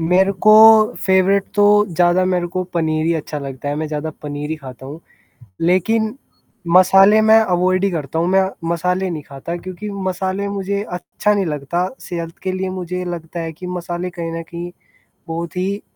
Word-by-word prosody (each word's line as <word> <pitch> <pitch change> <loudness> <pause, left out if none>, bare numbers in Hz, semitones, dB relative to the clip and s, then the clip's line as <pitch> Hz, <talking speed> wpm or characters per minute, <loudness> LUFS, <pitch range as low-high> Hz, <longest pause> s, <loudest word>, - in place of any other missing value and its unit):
मेरे 180 +4 +3
को 215 +2 +7
फ़ेवरेट 190 +1 +3
तो 205 0 +5
ज़्यादा 175 +1 +2
मेरे 180 -1 0
को 185 +1 -3
पनीर 155 -1 0
ही 170 - +2
अच्छा 150 -1 -4
लगता 135 0 -6
है, 145 - -1
मैं 155 +1 -2
ज़्यादा 150 +1 -3
पनीर 145 0 -5
ही 160 - -2
खाता 130 -3 -11
हूँ। 150 +4 -9 0.6
लेकिन 215 +6 +1 0.6
मसाले 195 +3 +6
मैं 220 +1 +6
अवॉइड 185 -2 +1
ही 200 - +2
करता 160 -3 -4
हूँ, 170 - +1
मैं 190 +1 +4 0.3
मसाले 180 +2 -1
नहीं 155 -3 -5
खाता 145 +5 -7
क्योंकि 185 +4 -7
मसाले 190 0 -3
मुझे 200 0 -2
अच्छा 195 +4 -1
नहीं 200 -2 0
लगता, 160 +4 -2
सेहत 170 -1 -6
के 185 - -2
लिए 185 0 -3
मुझे 180 0 -4
लगता 170 -1 -6
है 165 -1 -4
कि 180 +4 -10
मसाले 180 0 -4
कहीं 170 -2 -5
न 165 0 -4
कहीं 170 +1 -7 0.6
बहुत 165 +1 -5
ही 195 +3 -2
180 Hz, 180 wpm, -19 LUFS, 165-190 Hz, 0.6 s, को